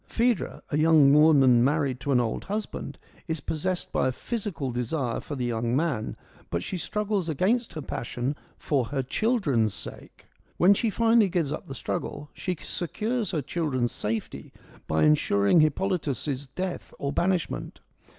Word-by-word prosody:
Phaedra, 235 -2 0
a 150 - +1
young 155 -3 +6
woman 140 -6 +6
married 140 -2 +1
to 140 - -2
an 125 - +4
old 115 -2 -2
husband, 210 +2 -4 0.3
is 160 -1 -1
possessed 175 +5 -2
by - - +1
a - - +1
physical 175 - -4
desire 125 +1 -1
for 145 - -6
the 125 -2 -2
young 120 0 -1
man, 140 -7 -1 0.3
but 85 0 -2
she - - -4
struggles 205 -1 -1
against 220 - +1
her 155 - -5
passion 125 +2 -3 0.2
for 135 -5 0
her 135 +2 -2
children's 140 - +1
sake. - - -8 0.3
When 185 +3 +6
she 225 +3 0
finally 225 0 +4
gives 165 -5 0
up 150 - -5
the 135 - -6
struggle, 145 +2 -4
she 180 -2 -3
secures 215 - -2
her 155 -4 -1
children's 140 -5 -1
safety 110 +1 -4 0.4
by 80 0 +2
ensuring 100 - +4
Hippolytus' 150 -4 0
death 185 +6 -5
or 140 0 -2
banishment. 180 -2 -1
150 Hz, 155 wpm, -27 LUFS, 130-185 Hz, 0.4 s, young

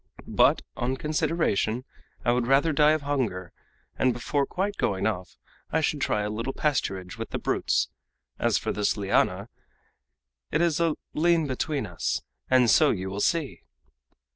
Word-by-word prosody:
But, - - +3
on 130 +2 -1
consideration, 150 - 0 0.4
I 120 - +4
would 120 -1 +1
rather 140 +4 +3
die 150 +2 +5
of 155 -2 -1
hunger, 115 -12 -2 0.5
and 130 -1 +3
before 140 +4 -1
quite 200 +2 -2
going 95 -1 0
off 95 -4 -3 0.3
I 160 - +2
should 150 -2 0
try 105 -4 +1
a 105 - -2
little 115 +5 -3
pasturage 95 -11 -2
with - - -4
the - - -3
brutes! - - 0 0.5
As - - +2
for - - -2
this 105 +1 0
liana, 100 0 +1 1.0
it 150 - 0
is 170 -2 +2
a 165 -3 +2 0.2
lien 165 0 +3
between 140 +2 -2
us, - - -2 0.3
and 130 -2 +5
so 150 +6 +5
you 95 -4 -2
will 100 +1 -3
see!" 165 - 0
130 Hz, 160 wpm, -26 LUFS, 105-155 Hz, 1.0 s, die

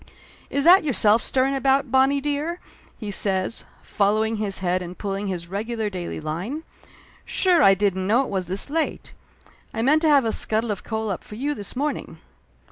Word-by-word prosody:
"Is 280 - 0
that 355 +3 +7
yourself 230 -6 +3
stirring 265 +1 +1
about, 270 0 +1
Bonnie 270 +2 +3
dear?" 295 +5 -2 0.4
he 210 -3 -5
says, 190 +1 0 0.2
following 215 +2 0
his 205 -2 -1
head 185 0 0
and 180 0 -8
pulling 200 0 -3
his 175 -3 -4
regular 215 +3 -3
daily 180 -2 -5
line. 175 - -4 0.6
"Sure 360 -4 +2
I 195 -8 +6
didn't 190 -1 0
know 235 +6 +3
it - - -7
was 190 -3 -2
this 195 +9 -2
late! 320 0 -2 0.6
I 225 - -1
meant 300 +5 +4
to 320 - +3
have 280 -4 +5
a 225 - +1
scuttle 220 +1 -1
of 200 - -5
coal 220 -2 -3
up 185 - -5
for 210 - -10
you 285 +6 -2
this 205 -3 -5
morning 295 +3 -3
220 Hz, 185 wpm, -23 LUFS, 195-275 Hz, 0.6 s, that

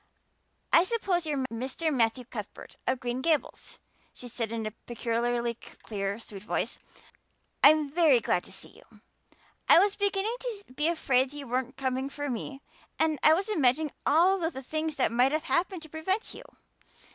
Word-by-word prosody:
"I 335 - +8
suppose 375 -5 0
you 305 - 0
are 265 - -1
Mr. 265 +7 -2
Matthew 240 0 +1
Cuthbert 215 -4 -9
of 255 -1 +1
Green 245 +1 -3
Gables?" 310 +1 -1 0.4
she 250 - -9
said 230 -2 -3
in 225 -1 -3
a 215 - -3 0.2
peculiarly 235 0 -1
clear, 200 -3 -5
sweet 210 -4 -10
voice. 210 - -2 0.8
"I'm 305 0 +7
very 310 -6 +5
glad - - 0
to - - -10
see - - -9
you. - - -20 0.7
I - - +9
was 395 +3 +4
beginning 405 +3 0
to 460 -5 -5
be 300 +4 +1
afraid 270 -5 +1
you 290 -1 -7
weren't 255 +2 -2
coming 265 0 -2
for 290 -1 -4
me 270 +4 -6 0.3
and 315 -2 +1
I 310 - +7
was 385 +4 -2
imagining 300 - +2
all 360 +6 +4
the 325 -6 -3
things 310 +3 -3
that 255 -5 +1
might 250 +4 +3
have 310 0 0
happened 350 0 -1
to 315 - -11
prevent 375 +8 -2
you. - - -11
280 Hz, 170 wpm, -28 LUFS, 245-330 Hz, 0.8 s, I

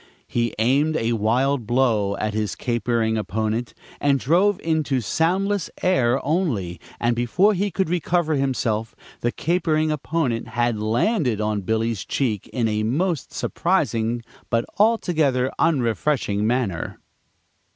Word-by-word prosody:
He 120 -2 -1
aimed 140 +8 +2
a 115 -2 0
wild 120 +3 +1
blow 115 -5 +2
at 105 0 -2
his 105 -2 -2
capering 115 -2 0
opponent, 110 +4 -2 0.2
and 140 -1 +2
drove 180 +9 +3
into 155 -5 0
soundless 180 - 0
air 135 -9 +3
only, 135 - -1 0.2
and 120 0 +1
before 175 - +3
he 200 +2 0
could 190 0 -1
recover 170 -1 0
himself 120 -6 -1 0.2
the 120 - 0
capering 155 -1 0
opponent 150 -5 -1
had 120 -2 0
"landed" 120 - +1
on 105 -1 -1
Billy's 110 +1 -1
cheek 110 -8 -1
in 120 -3 -1
a 105 -1 0
most 150 - -1
surprising 120 - 0 0.3
but 115 0 +1
altogether 160 - +2
unrefreshing 120 - +1
manner. 115 -8 -1
125 Hz, 125 wpm, -23 LUFS, 110-160 Hz, 0.3 s, drove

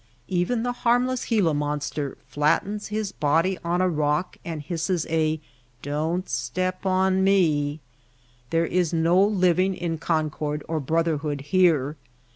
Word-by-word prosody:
Even 190 +6 0
the 245 - 0
harmless 250 +1 +2
Gila 200 -9 +2
monster 145 -1 -2
flattens 195 +8 0
his 215 -1 -3
body 165 +6 +1
on 175 +2 0
a 185 - +3
rock 150 +1 0
and 165 -2 -5
hisses 165 +1 -1
a 160 -1 +1 0.4
^^Don^t 160 +6 -2
step 185 +11 -2
on 190 0 +2
me/' 155 -6 +2 0.7
There 165 0 +2
is 175 -1 0
no 170 +3 +3
living 185 -2 +2
in 165 -3 -3
concord 155 -2 -1
or 160 -1 -1
brother 165 +2 +1
hood 145 -1 -3
here. 150 -2 +2
165 Hz, 135 wpm, -25 LUFS, 150-185 Hz, 0.7 s, a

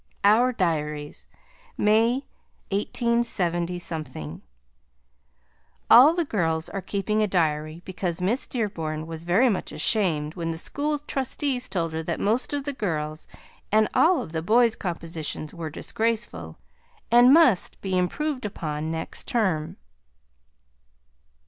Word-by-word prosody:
OUR 225 +5 +5
DIARIES 150 -7 -2 0.5
May, 230 +6 +3 0.5
187 175 - -2 1.5
All 280 +7 +9
the 345 -2 0
girls 165 - -1
are 195 - -4
keeping 210 +3 -1
a 215 - +2
diary 155 -2 -1
because 180 -2 -3
Miss 205 +9 0
Dearborn 165 -10 -3
was 165 0 -7
very 195 +9 +4
much 205 -6 -1
ashamed 160 -8 +1
when 170 -2 -4
the 165 - -3
school 295 - -2
trustees 270 -2 -2
told 170 -4 -2
her 160 - -2
that 165 +1 -3
most 230 +5 0
of 285 -1 -2
the 285 0 -3
girls' 155 - -3 0.4
and 215 0 +4
all 330 -6 +4
of 160 - -10
the 160 -1 -2
boys' 230 +6 +3
compositions 165 -4 -5
were 165 -2 -5
disgraceful, 145 - -3 0.5
and 240 +2 +7
must 270 - +4
be 190 -1 -2
improved 260 - -1
upon 155 -6 -4
next 160 0 -4
term. 185 -10 0
185 Hz, 125 wpm, -25 LUFS, 160-235 Hz, 1.5 s, All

